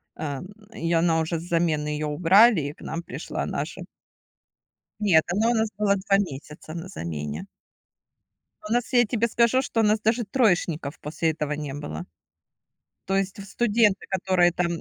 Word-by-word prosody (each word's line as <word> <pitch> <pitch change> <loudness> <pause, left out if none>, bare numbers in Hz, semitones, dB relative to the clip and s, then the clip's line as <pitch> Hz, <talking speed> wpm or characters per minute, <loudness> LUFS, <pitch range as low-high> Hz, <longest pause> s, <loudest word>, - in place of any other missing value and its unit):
ам, 145 +1 -5 0.3
и 165 -5 -3
она 165 -1 +3
уже 160 +1 -1
с - - -9
замены 165 -3 0
её 150 0 -2
убрали, 185 +6 +5
и 145 +1 -4
к - - -21
нам 165 +2 -5
пришла - - -5
наша. - - -4 1.2
Нет, 175 -7 +4
она 220 +5 +2
у 240 - +2
нас 220 0 +1
была 205 -1 +3
2 195 +1 +2
месяца 155 -3 -5
на 170 +2 -6
замене. 75 - -5 1.2
У 220 - -2
нас, 245 +1 0
я 245 0 +6
тебе 235 +1 0
скажу, 235 +3 +3
что 235 -3 -1
у - - +4
нас 215 0 +3
даже 225 +2 +1
троечников 175 - 0
после 160 +2 -1
этого 150 -2 -3
не 150 -2 -4
было. 80 - -6 1.0
То 195 - +1
есть 195 0 -1
в 200 - -7
студенты, 210 -1 +2
которые 185 -2 +2
там, 180 0 0
175 Hz, 170 wpm, -25 LUFS, 155-210 Hz, 1.2 s, я